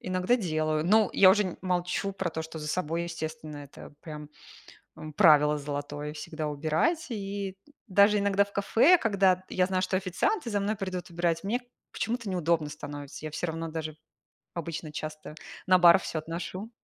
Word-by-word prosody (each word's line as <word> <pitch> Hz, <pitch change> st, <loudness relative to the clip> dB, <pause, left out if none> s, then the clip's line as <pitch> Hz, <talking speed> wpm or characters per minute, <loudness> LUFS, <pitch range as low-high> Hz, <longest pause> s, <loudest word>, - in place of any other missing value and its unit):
Иногда 185 Hz, +6 st, +1 dB
делаю. 155 Hz, -6 st, -1 dB
Но 215 Hz, +4 st, +4 dB
я 190 Hz, -1 st, +7 dB
уже 210 Hz, +2 st, +4 dB
н 185 Hz, -, -5 dB
молчу 180 Hz, +1 st, -1 dB
про 190 Hz, -2 st, -3 dB
то, 160 Hz, 0 st, -4 dB
что 160 Hz, 0 st, -8 dB
за 150 Hz, -1 st, -5 dB
собой, 170 Hz, 0 st, -1 dB
естественно, 155 Hz, -2 st, -6 dB
это, 145 Hz, 0 st, -11 dB
прям, 150 Hz, -3 st, -8 dB, 0.7 s
эм, 155 Hz, -, -8 dB
правило 150 Hz, -3 st, +5 dB
золотое- 145 Hz, +1 st, -5 dB
всегда 155 Hz, 0 st, -5 dB
убирать. 160 Hz, -, 0 dB
И 200 Hz, -3 st, -4 dB, 0.3 s
даже 200 Hz, +2 st, +5 dB
иногда 200 Hz, 0 st, +3 dB
в 200 Hz, -, -18 dB
кафе, 230 Hz, -, +4 dB
когда 195 Hz, -, +2 dB
я 180 Hz, -1 st, +1 dB
знаю, 185 Hz, -1 st, 0 dB
что 185 Hz, 0 st, 0 dB
официанты 190 Hz, -, -1 dB
за 205 Hz, -1 st, 0 dB
мной 210 Hz, +2 st, -1 dB
придут 185 Hz, -3 st, -5 dB
убирать, 170 Hz, 0 st, -1 dB
мне 230 Hz, +5 st, 0 dB, 0.3 s
почему-то 230 Hz, -2 st, -3 dB
неудобно 170 Hz, -4 st, +1 dB
становится. 145 Hz, 0 st, -8 dB
Я -, -, -4 dB
всё 170 Hz, +3 st, -3 dB
равно 165 Hz, 0 st, -4 dB
даже 155 Hz, -1 st, -5 dB, 0.6 s
обычно 165 Hz, -2 st, -5 dB
часто 155 Hz, 0 st, -7 dB, 0.3 s
на 185 Hz, 0 st, +6 dB
бар 175 Hz, +1 st, +8 dB
всё 165 Hz, -, -4 dB
отношу. 175 Hz, +6 st, -6 dB
175 Hz, 170 wpm, -28 LUFS, 155-195 Hz, 0.7 s, бар